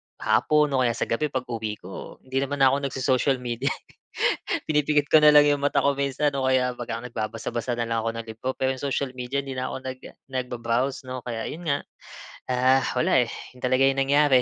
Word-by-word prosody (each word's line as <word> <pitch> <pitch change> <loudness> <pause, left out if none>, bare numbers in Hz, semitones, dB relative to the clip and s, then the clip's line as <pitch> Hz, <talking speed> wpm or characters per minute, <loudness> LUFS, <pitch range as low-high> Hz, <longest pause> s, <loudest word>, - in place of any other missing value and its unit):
hapon 150 -1 +2
o 135 - +1
kaya 120 -2 +1
sa - - -1
gabi, 135 +7 0
pag-uwi 120 -6 -3
ko, 95 +1 -9
hindi 130 +1 -2
naman 140 0 0
na 130 - +7
ko 140 - +1
nag-so-social 135 -1 +1
media, 120 -2 -3
eh. - - -7 0.8
Pinipikit 150 -1 +2
ko 155 - +8
na 150 - +6
lang 150 0 +8
'yong 145 -1 +2
mata 140 0 +2
ko 140 - +4
minsan 140 +1 0
o 130 - 0
kaya 130 -1 +2
pag 120 -1 -7
ka 115 - -4
nagbabasa-basa 115 +1 -3
na 120 - -1
lang 115 0 0
ako 115 - 0
ng 115 0 -5
libro. 115 +4 -5
Pero 130 0 0
'yong 130 - -9
social 135 0 -1
media 130 +2 -3
'di 135 - -7
na 130 - -2
ko 130 - -6
nag 130 0 -6 0.3
nag-ba-browse 125 +1 -1
'no. 130 0 -4
Kaya 115 -2 -3
'yon 170 +2 -8
nga, 140 -2 +2 0.7
ah, 130 +1 +4 0.2
wala 125 0 +4
eh, - - -8 0.2
yun 125 - -17
talaga 130 +1 +3
yung 135 0 +2
nangyari. 140 -1 +4
130 Hz, 215 wpm, -25 LUFS, 120-140 Hz, 0.8 s, ko